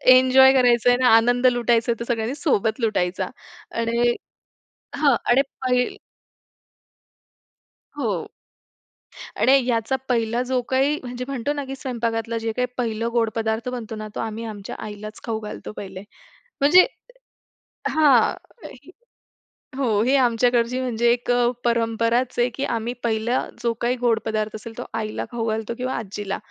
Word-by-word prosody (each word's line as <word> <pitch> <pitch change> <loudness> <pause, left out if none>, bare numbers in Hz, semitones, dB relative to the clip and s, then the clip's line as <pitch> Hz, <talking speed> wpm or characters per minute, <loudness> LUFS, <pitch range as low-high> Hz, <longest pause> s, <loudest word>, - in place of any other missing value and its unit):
Enjoy 260 +1 +6
करायचं 245 -2 +4
आहे 245 - +4
ना, 255 - +5
आनंद 245 +2 +3
लुटायचं 240 -1 +2
तर 235 - -4
सगळ्यांनी 235 +1 -1
सोबत 245 - 0
लुटायचा 190 -6 0 0.5
आणि 235 +1 +2 0.8
हां, 285 -2 +4
आणि 245 +3 +4 0.2
पहील 250 -1 +1 2.0
हो. 210 - -1 1.2
आणि 260 - +5
याचा 230 +1 0
पहिला 235 -1 +1
जो 255 0 0
काही 275 +3 +2
म्हणजे 250 0 -5
म्हणतो 275 0 -2
ना, 290 -1 -4
की 270 0 -6
स्वयंपाकघरातला 230 -3 -2
जे 225 0 -2
काही 250 +3 0
पहिलं 230 -1 -1
गोड 230 -2 +1
पदार्थ 225 +1 -1
बनतो 240 -3 -5
ना, 215 0 -6
तो - - -3
आम्ही 225 0 -4
आमच्या 210 -3 -7
आईलाच 215 0 -8
खाऊ 225 -2 -2
घालतो 210 0 -7
पहिले. 190 -1 -7 0.6
म्हणजे 325 +7 +7 1.0
हां, 290 -7 +4 0.4
ही - - -16 0.9
हो, 225 -7 +1
ही 260 +4 +3
आमच्याकडची 245 -1 +2
म्हणजे 240 -2 +1
एक 245 0 0
अ, 245 0 +3 0.2
परंपराच 235 +1 +1
आहे, 240 +1 +3
की 270 - -3
आम्ही 230 +1 -2
पहिला 235 +2 0 0.2
जो 235 -1 +1
काही 240 +1 +1
गोड 235 -2 +2
पदार्थ 215 -1 -2
असेल, 225 +1 -9
तो - - -4 0.2
आईला 215 -1 -4
खाऊ 230 -2 -3
घालतो 220 +1 -2
किंवा 255 +1 -2
आजीला, 205 -2 -4
235 Hz, 145 wpm, -23 LUFS, 225-250 Hz, 2.0 s, म्हणजे